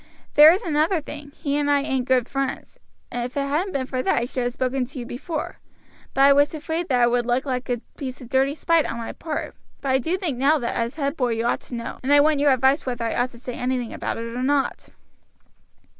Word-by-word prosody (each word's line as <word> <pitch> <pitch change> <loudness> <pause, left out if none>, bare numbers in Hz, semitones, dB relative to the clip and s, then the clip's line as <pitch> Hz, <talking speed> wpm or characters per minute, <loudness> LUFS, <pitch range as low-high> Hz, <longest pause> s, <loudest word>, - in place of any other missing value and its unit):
There 300 +2 +9
is 370 - 0
another 320 +2 +1
thing; 290 -1 -9
he 280 -1 -2
and 290 -1 0
I 285 -1 +4
ain't 265 -3 -1
good 255 -2 +2
friends. 275 -1 -4 0.3
If 245 +2 -4
it - - +2
hadn't 305 +8 -1
been 265 -2 -1
for 255 0 -2
that - - +1
I 235 - +1
should 250 0 -3
have 245 - -1
spoken 255 +1 -1
to 260 +3 -8
you 245 - -5
before; 300 +6 -5 0.6
but 270 - +2
I 280 +1 +8
was 285 +3 +3
afraid 325 +2 -3
that 250 -5 +2
it 240 - +4
would 240 -1 +1
look 250 +3 +1
like 255 -2 -3
a 240 -2 -1 0.2
piece 260 -3 -6
of 250 - -10
dirty 270 +3 +1
spite 330 -1 +2
on - - -4
my 230 -1 -5
part; 310 -2 -5 0.2
but 275 - -4
I 260 0 +3
do 330 +8 -1
think 320 -10 -3
now 290 +4 +4
that 240 -5 -2
as 235 +2 -2
head 280 -1 -1
boy 250 -6 0
you 225 +1 -2
ought 240 - 0
to 245 - -5
know, 235 - -6
and 265 - -1
I 290 - +7
want 300 0 +4
your 290 0 +4
advice 265 +3 +3
whether 245 -2 -3
I 225 - -1
ought 245 +1 +1
to - - -12
say 250 0 -6
anything 250 -2 -2
about - - -3
it 230 0 -5
or 250 - -2
not." 275 +1 0
265 Hz, 255 wpm, -23 LUFS, 245-290 Hz, 0.6 s, There